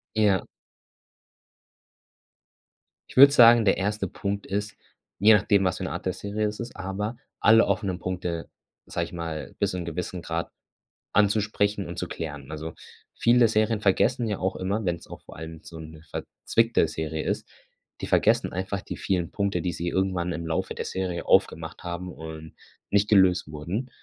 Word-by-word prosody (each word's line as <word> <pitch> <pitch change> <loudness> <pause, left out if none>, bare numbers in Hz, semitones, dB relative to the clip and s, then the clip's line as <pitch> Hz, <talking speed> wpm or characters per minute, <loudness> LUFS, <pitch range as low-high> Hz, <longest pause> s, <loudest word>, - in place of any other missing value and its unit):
Ja. 105 -4 +3 2.7
Ich - - -14
würde 140 +2 +9
sagen, 120 -3 +8
der 95 - +4
1. 100 +1 -1
Punkt 100 +2 -4
ist, 105 +2 -3 0.4
je 110 +3 +7
nachdem, 100 -1 +3
was 90 -1 0
für - - -6
'ne 95 - -3
Art - - -5
der 95 - +1
Serie 105 +3 -2
es 105 0 -4
ist, 120 0 -7
aber 95 +4 -4 0.2
alle 115 +1 +6
offenen 95 -2 -1
Punkte, 90 -2 -4 0.4
sage - - -2
ich - - -13
mal, 80 -3 -5
bis - - +1
zum 90 -1 -4
gewissen 85 +2 -4
Grad 85 0 -3 0.7
anzusprechen 105 -1 +2
und 85 - -7
zu 90 - -3
klären. 75 -3 -6
Also, 80 +1 -6 0.4
viele 120 0 +5
Serien 110 0 +1
vergessen 115 +4 +2
ja 105 -2 -1
auch 95 +1 -1
immer- 100 +4 -1
wenn's 85 -2 -2
auch - - -10
vor - - -13
allem 80 0 -8
so 80 - -10
'ne 80 0 -10
verzwickte 115 -7 0
Serie 80 0 -3
ist- - - -2 0.5
die - - -3
vergessen - - +3
einfach 95 +2 -3
die - - -7
vielen 90 -3 -1
Punkte, 100 -4 -1
die 90 - -1
sie 85 +1 -4
irgendwann 90 -1 0
im 85 +1 -5
Laufe 80 0 -2
der - - -3
Serie 90 -3 -3
aufgemacht 80 0 +1
haben 90 +1 -5
und 80 0 -9 0.3
nicht 100 0 +3
gelöst 95 -6 +4
wurden. 85 - -4
95 Hz, 170 wpm, -26 LUFS, 85-105 Hz, 2.7 s, würde